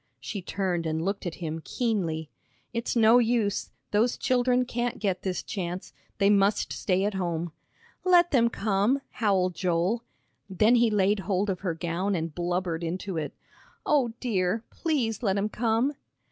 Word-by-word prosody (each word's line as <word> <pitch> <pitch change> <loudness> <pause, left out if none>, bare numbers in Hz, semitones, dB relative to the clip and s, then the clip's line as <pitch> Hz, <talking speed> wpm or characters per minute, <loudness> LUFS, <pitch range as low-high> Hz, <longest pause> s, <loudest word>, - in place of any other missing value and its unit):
She 200 - -5
turned 180 -3 -2
and 160 +1 -1
looked 195 -1 -2
at 170 - -4
him 160 -2 -4
keenly. 170 - -2 0.4
"It's 235 +1 -2
no 230 +1 +6
use, 225 -4 +1 0.2
those 220 +4 +2
children 250 0 +2
can't 240 0 -2
get 190 -3 -1
this 185 -2 -2
chance. 180 -2 -5 0.2
They 200 - +3
must 200 0 +3
stay 190 0 0
at 205 - 0
home." 175 -3 -2 0.5
"Let 355 -1 +5
them 235 -5 +4
come," 215 +6 +1
howled 190 -4 +1
Joel. 180 +6 0 0.5
Then 210 +5 +4
he 240 -1 +5
laid 205 0 +2
hold 195 +1 0
of 185 - -4
her 180 -4 -2
gown 175 +4 -1
and 165 -2 -3
blubbered 175 -1 -2
into 185 +3 -3
it. 150 -2 -3 0.5
"O 265 -6 +2
dear! 210 -2 0
Please 255 - -1
let 200 -4 +1
'em 205 +2 0
come!" 230 +5 +1
200 Hz, 160 wpm, -27 LUFS, 180-230 Hz, 0.5 s, no